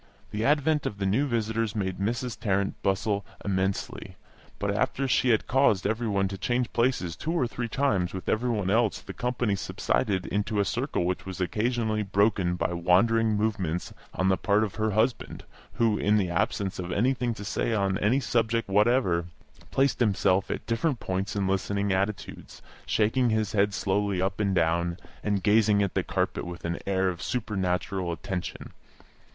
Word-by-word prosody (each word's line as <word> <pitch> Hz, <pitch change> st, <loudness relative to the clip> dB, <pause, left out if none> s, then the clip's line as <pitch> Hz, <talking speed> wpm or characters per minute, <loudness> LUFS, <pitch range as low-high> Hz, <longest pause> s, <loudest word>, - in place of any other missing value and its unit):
The 105 Hz, +1 st, -2 dB
advent 150 Hz, +2 st, +2 dB
of 100 Hz, -, -5 dB
the 100 Hz, -, -2 dB
new 115 Hz, +10 st, +2 dB
visitors 115 Hz, -2 st, -1 dB
made 95 Hz, -3 st, -2 dB
Mrs. 115 Hz, +4 st, -2 dB
Tarrant 100 Hz, -2 st, 0 dB
bustle 100 Hz, +1 st, 0 dB, 0.2 s
immensely; 95 Hz, 0 st, -2 dB, 0.4 s
but -, -, -1 dB
after 135 Hz, 0 st, 0 dB
she 130 Hz, 0 st, +2 dB
had 110 Hz, -3 st, +3 dB
caused 125 Hz, -7 st, +3 dB
every 110 Hz, +3 st, 0 dB
one 100 Hz, -2 st, +1 dB
to 95 Hz, -1 st, -6 dB
change 120 Hz, +3 st, -1 dB
places 115 Hz, -9 st, +1 dB
two 160 Hz, -, -3 dB
or 165 Hz, -7 st, +1 dB
three 120 Hz, 0 st, -4 dB
times 105 Hz, -8 st, 0 dB
with 95 Hz, -, -7 dB
every 120 Hz, +3 st, +1 dB
one 105 Hz, -5 st, 0 dB
else 110 Hz, -1 st, +2 dB
the 100 Hz, -2 st, -9 dB
company 120 Hz, 0 st, -1 dB
subsided 95 Hz, 0 st, -1 dB
into 105 Hz, +1 st, -1 dB
a 100 Hz, -, +2 dB
circle 125 Hz, -3 st, -1 dB
which 90 Hz, +1 st, -2 dB
was 95 Hz, -1 st, -6 dB
occasionally 110 Hz, +3 st, 0 dB
broken 100 Hz, -3 st, +1 dB
by 85 Hz, -, -1 dB
wandering 105 Hz, +6 st, +3 dB
movements 95 Hz, -6 st, -1 dB, 0.2 s
on 95 Hz, -, 0 dB
the 95 Hz, -, +3 dB
part 105 Hz, +1 st, +2 dB
of 105 Hz, -, -3 dB
her 110 Hz, 0 st, 0 dB
husband, 110 Hz, +4 st, 0 dB, 0.3 s
who, 115 Hz, -3 st, +2 dB
in 105 Hz, +1 st, +3 dB
the 95 Hz, -4 st, 0 dB
absence 95 Hz, +3 st, -1 dB
of 90 Hz, 0 st, -4 dB
anything 120 Hz, +3 st, +1 dB
to 105 Hz, -, -8 dB
say 110 Hz, -, -1 dB
on 100 Hz, -3 st, +1 dB
any 115 Hz, +7 st, +3 dB
subject 115 Hz, -3 st, 0 dB
whatever, 100 Hz, -4 st, +3 dB, 0.4 s
placed 135 Hz, -1 st, +1 dB
himself 100 Hz, -4 st, +2 dB
at -, -, -4 dB
different 120 Hz, +3 st, 0 dB
points 95 Hz, +2 st, -3 dB
in 100 Hz, -2 st, 0 dB
listening 100 Hz, +1 st, 0 dB
attitudes, 100 Hz, +2 st, -3 dB, 0.2 s
shaking 115 Hz, +3 st, +2 dB
his 110 Hz, -3 st, 0 dB
head 105 Hz, -1 st, +2 dB
slowly 100 Hz, 0 st, 0 dB
up 95 Hz, +1 st, -1 dB
and 100 Hz, -2 st, +1 dB
down, 85 Hz, +1 st, +1 dB, 0.3 s
and 100 Hz, -2 st, 0 dB
gazing 105 Hz, -1 st, +4 dB
at 100 Hz, -, -2 dB
the -, -, +1 dB
carpet -, -, -2 dB
with 85 Hz, 0 st, -7 dB
an 85 Hz, 0 st, -2 dB
air 95 Hz, -1 st, +1 dB
of 90 Hz, -2 st, -3 dB
supernatural 95 Hz, -5 st, -2 dB
attention. 90 Hz, +1 st, -5 dB
105 Hz, 175 wpm, -27 LUFS, 95-115 Hz, 0.4 s, gazing